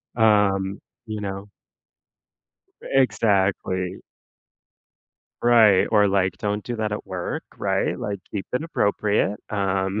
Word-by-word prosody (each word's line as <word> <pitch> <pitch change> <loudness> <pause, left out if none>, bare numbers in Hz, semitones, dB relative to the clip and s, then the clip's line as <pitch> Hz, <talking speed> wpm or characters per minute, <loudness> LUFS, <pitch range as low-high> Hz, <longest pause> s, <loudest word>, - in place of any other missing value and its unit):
Um, 100 -3 +2 0.3
you 110 -2 -5
know 100 0 -5 1.3
E 135 - +2
exactly. 95 -5 0 1.5
Right, 110 -5 +6
or 105 -1 +5
like, 95 -2 +1
don't 105 0 -2
do 120 -1 -4
that 110 -1 -2
at 105 - -5
work, 90 -2 -4
right? - - 0
Like, 100 -1 -3
keep 100 -2 -4
it 125 +5 0
appropriate. 105 -7 0
Um 95 0 -1
100 Hz, 115 wpm, -23 LUFS, 95-110 Hz, 1.5 s, Right